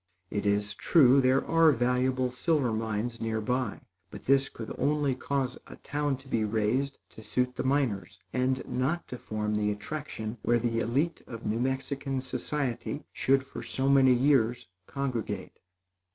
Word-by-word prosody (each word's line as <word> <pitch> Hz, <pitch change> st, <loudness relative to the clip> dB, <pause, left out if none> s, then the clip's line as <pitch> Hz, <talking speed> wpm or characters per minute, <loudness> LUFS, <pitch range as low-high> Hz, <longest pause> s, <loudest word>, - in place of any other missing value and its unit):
It 105 Hz, 0 st, -1 dB
is 105 Hz, 0 st, +1 dB
true 135 Hz, -, +5 dB
there 130 Hz, +1 st, +3 dB
are 165 Hz, -1 st, +5 dB
valuable 125 Hz, 0 st, +1 dB
silver 130 Hz, -2 st, +1 dB
mines 110 Hz, +1 st, -2 dB
near 110 Hz, -1 st, -1 dB
by; 125 Hz, +1 st, -1 dB, 0.3 s
but -, -, -10 dB
this 135 Hz, 0 st, +3 dB
could 115 Hz, -, -7 dB
only 145 Hz, -2 st, +2 dB
cause 135 Hz, 0 st, -2 dB
a -, -, -10 dB
town 145 Hz, -2 st, -2 dB
to 135 Hz, +1 st, -16 dB
be 115 Hz, -4 st, 0 dB
raised 110 Hz, +6 st, 0 dB
to -, -, -12 dB
suit 125 Hz, +4 st, -1 dB
the -, -, -2 dB
miners 120 Hz, -8 st, 0 dB
and 130 Hz, 0 st, 0 dB
not 140 Hz, +7 st, -1 dB
to 125 Hz, -, -6 dB
form 105 Hz, 0 st, -2 dB
the 105 Hz, 0 st, +1 dB
attraction 110 Hz, 0 st, -5 dB
where 120 Hz, +2 st, +3 dB
the 115 Hz, -1 st, 0 dB
élite 140 Hz, +9 st, 0 dB
of 115 Hz, -1 st, -8 dB
New 110 Hz, +2 st, 0 dB
Mexican 135 Hz, +1 st, -2 dB
society 130 Hz, 0 st, -3 dB
should 135 Hz, 0 st, +2 dB
for 135 Hz, -, -8 dB
so 135 Hz, 0 st, -2 dB
many 135 Hz, -2 st, +6 dB
years 125 Hz, -3 st, +2 dB, 0.2 s
congregate. 135 Hz, -5 st, -4 dB
125 Hz, 160 wpm, -29 LUFS, 115-135 Hz, 0.3 s, many